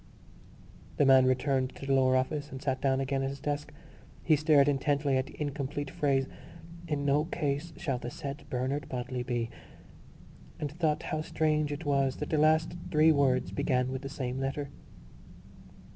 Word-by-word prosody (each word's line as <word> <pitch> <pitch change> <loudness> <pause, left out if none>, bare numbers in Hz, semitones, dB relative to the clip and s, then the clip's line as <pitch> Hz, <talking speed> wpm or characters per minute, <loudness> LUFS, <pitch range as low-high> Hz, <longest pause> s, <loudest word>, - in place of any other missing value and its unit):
_ - - -20
The 145 - +4
man 130 -1 +6
returned 130 0 +1
to - - -8
the 135 - +1
lower 130 -1 +4
office 145 +3 -1
and 130 - -7
sat 130 -1 -2
down 135 -1 +2
again 135 0 -1
at 135 - -1
his 140 0 -7
desk. 145 +1 -3 0.5
He 155 - +5
stared 150 -2 +4
intently 145 0 +1
at 130 0 0
the - - -13
incomplete 145 -1 -3
phrase: 135 -2 +1 0.6
In 145 -2 -1
no 145 +2 +3
case 155 -1 -2
shall 135 -7 -2
the 120 - -5
said 140 +1 -6
Bernard 130 +3 -2
Bodley 125 0 -3
be... 120 -2 -2 1.1
and 145 -2 -3
thought 155 -1 0
how 155 - -2
strange 155 -1 0
it 150 +2 -5
was 140 -2 +2
that 150 - -5
the 155 - +2
last 155 +2 +3 0.2
three 155 +1 +5
words 135 -4 +2
began 125 -1 0
with 130 0 -4
the 135 - -6
same 130 -2 -4
letter. 135 +1 -2
140 Hz, 175 wpm, -30 LUFS, 130-150 Hz, 1.1 s, man